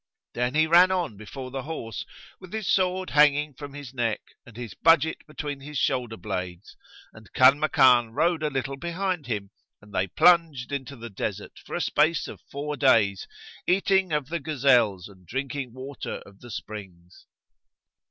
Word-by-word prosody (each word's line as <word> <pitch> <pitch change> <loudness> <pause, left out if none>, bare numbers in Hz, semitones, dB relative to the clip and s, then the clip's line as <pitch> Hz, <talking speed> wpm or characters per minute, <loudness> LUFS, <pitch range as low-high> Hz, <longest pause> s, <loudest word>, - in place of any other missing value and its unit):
Then 125 +3 -1
he 155 +1 +4
ran 175 +3 +6
on 175 - -1
before 125 +6 -8
the 135 0 -4
horse, 125 -7 -6 0.3
with 185 0 -13
his 220 -2 -3
sword 185 0 +1
hanging 150 0 +4
from 145 +1 -9
his 140 -3 -9
neck 115 -4 -1 0.3
and 115 -2 -14
his 120 -5 -7
budget 160 -1 +3
between 145 -2 -5
his 145 +2 -7
shoulder 120 -3 0
blades, 90 -3 -6 0.4
and 110 -4 -16
Kanmakan 130 -3 +5
rode 165 +6 +1
a 155 - 0
little 135 0 -3
behind 170 -1 -3
him; 105 -4 -3 0.3
and 105 -1 -18
they 95 0 0
plunged 155 - +3
into 140 0 -4
the 115 -2 -9
desert, 95 - -5
for - - -5
a - - -1
space 155 +2 +2
of - - -10
four 145 +1 -4
days, 110 -8 +3 0.4
eating 190 0 +2
of 150 -3 -1
the 170 +1 -2
gazelles 125 - +2
and 95 -3 -18
drinking 130 - -4
water 130 +2 -7
of 100 0 -17
the 120 - -12
springs. 95 -6 -9
135 Hz, 165 wpm, -26 LUFS, 115-155 Hz, 0.4 s, ran